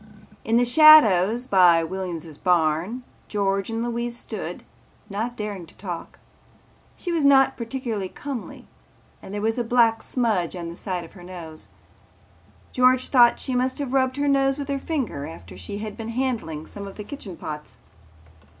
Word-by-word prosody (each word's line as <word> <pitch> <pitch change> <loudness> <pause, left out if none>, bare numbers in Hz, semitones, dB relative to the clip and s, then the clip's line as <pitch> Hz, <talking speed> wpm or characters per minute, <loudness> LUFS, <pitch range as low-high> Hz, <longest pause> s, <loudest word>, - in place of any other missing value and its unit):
In 225 +1 +2
the 245 - +4
shadows 245 - +7
by 180 -6 +5
Williams' 170 -3 -5
barn 175 - +1 0.2
George 195 -1 0
and 225 0 -2
Louise 240 0 -3
stood, - - -6 0.5
not 230 +4 -3
daring 205 -5 -5
to - - -17
talk. 180 -4 -7 0.8
She 350 - -4
was 330 -3 0
not 270 -1 +5
particularly 230 -5 -4
comely 275 -1 -7 0.6
and - - -10
there 205 0 -4
was 225 +2 0
a - - +1
black 230 -1 +3
smudge 215 -9 -1
on 170 -2 -5
the 170 - -8
side 180 -2 -4
of - - -15
her 180 - -14
nose. 170 -3 -7 1.0
George 255 0 +3
thought 240 -3 +6
she 260 - -4
must 255 +1 0
have 280 -3 -4
rubbed 260 0 +1
her 285 0 0
nose 270 -1 +2
with 285 -1 -5
her 275 -1 -1
finger 265 - -3
after 90 - -11
she 90 - -7
had 210 0 -6
been 225 0 -6
handling 230 -11 -2
some 200 -1 -8
of 195 - -10
the 210 - -7
kitchen 205 - -9
pots. 150 -1 -7
225 Hz, 170 wpm, -24 LUFS, 180-255 Hz, 1.0 s, shadows